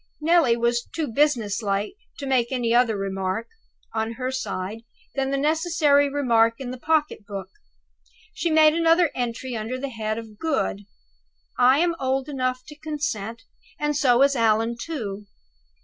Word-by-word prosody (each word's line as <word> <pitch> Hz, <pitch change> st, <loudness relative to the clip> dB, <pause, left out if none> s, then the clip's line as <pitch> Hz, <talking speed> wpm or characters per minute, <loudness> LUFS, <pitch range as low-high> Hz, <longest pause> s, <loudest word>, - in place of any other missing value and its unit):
Neelie 315 Hz, -7 st, +4 dB
was 235 Hz, 0 st, 0 dB
too 320 Hz, -2 st, -1 dB
business 235 Hz, -6 st, +1 dB
like 200 Hz, -, -1 dB, 0.2 s
to 280 Hz, -, -6 dB
make 255 Hz, -3 st, +1 dB
any 240 Hz, -3 st, 0 dB
other 240 Hz, -3 st, +3 dB
remark, 195 Hz, +2 st, -2 dB, 0.5 s
on 220 Hz, +1 st, -1 dB
her 255 Hz, +2 st, -3 dB
side, 215 Hz, -5 st, -4 dB, 0.3 s
than 270 Hz, -1 st, -1 dB
the 275 Hz, -, 0 dB
necessary 300 Hz, -1 st, +3 dB
remark 230 Hz, -5 st, +3 dB
in 255 Hz, -2 st, -6 dB
the 255 Hz, -, -7 dB
pocket 305 Hz, -5 st, 0 dB
book. 195 Hz, -2 st, -6 dB, 0.8 s
She 340 Hz, -, -1 dB
made 310 Hz, -1 st, +6 dB
another 330 Hz, 0 st, +3 dB
entry 245 Hz, +1 st, -3 dB
under 225 Hz, +3 st, -3 dB
the 275 Hz, +2 st, -4 dB
head 220 Hz, -2 st, -3 dB
of 220 Hz, -2 st, -9 dB
"Good": 270 Hz, -10 st, -1 dB, 0.7 s
"I 255 Hz, +2 st, +6 dB
am 340 Hz, +2 st, +2 dB
old 265 Hz, +1 st, -1 dB
enough 255 Hz, -2 st, -2 dB
to 300 Hz, 0 st, -12 dB
consent, 230 Hz, -8 st, -4 dB, 0.4 s
and 295 Hz, 0 st, 0 dB
so 260 Hz, -3 st, +4 dB
is 280 Hz, 0 st, +3 dB
Allan 225 Hz, 0 st, +2 dB
too. 215 Hz, -8 st, -5 dB
255 Hz, 155 wpm, -24 LUFS, 225-290 Hz, 0.8 s, made